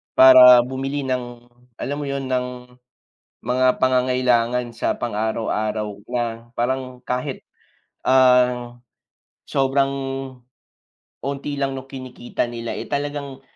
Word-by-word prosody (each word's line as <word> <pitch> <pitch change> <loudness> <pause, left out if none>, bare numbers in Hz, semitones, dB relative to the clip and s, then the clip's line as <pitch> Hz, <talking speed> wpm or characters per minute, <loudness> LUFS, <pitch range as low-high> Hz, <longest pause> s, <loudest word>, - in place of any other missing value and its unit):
para 125 -1 +9
bumili 135 +2 -4
ng 120 -2 -4 0.4
alam 145 +1 -3
mo 145 - -4
yun? 140 -1 -3
Ng, 125 -1 -4 0.7
mga 130 +1 +2
pangangailangan 125 -2 +2
sa 115 - -1
pang-araw-araw, 110 -1 -2 0.2
na 120 -1 -3
parang 130 +1 -3
kahit, 125 +2 -4 0.6
ang, 125 -2 +3 0.7
sobrang, 135 0 +1 1.4
unti 140 +1 -4
lang 135 -1 -1
no'ng 135 0 -7
kinikita 130 -3 -5
nila, 120 -1 -5
eh, - - -5
talagang 140 -1 -4
125 Hz, 100 wpm, -21 LUFS, 120-135 Hz, 1.4 s, para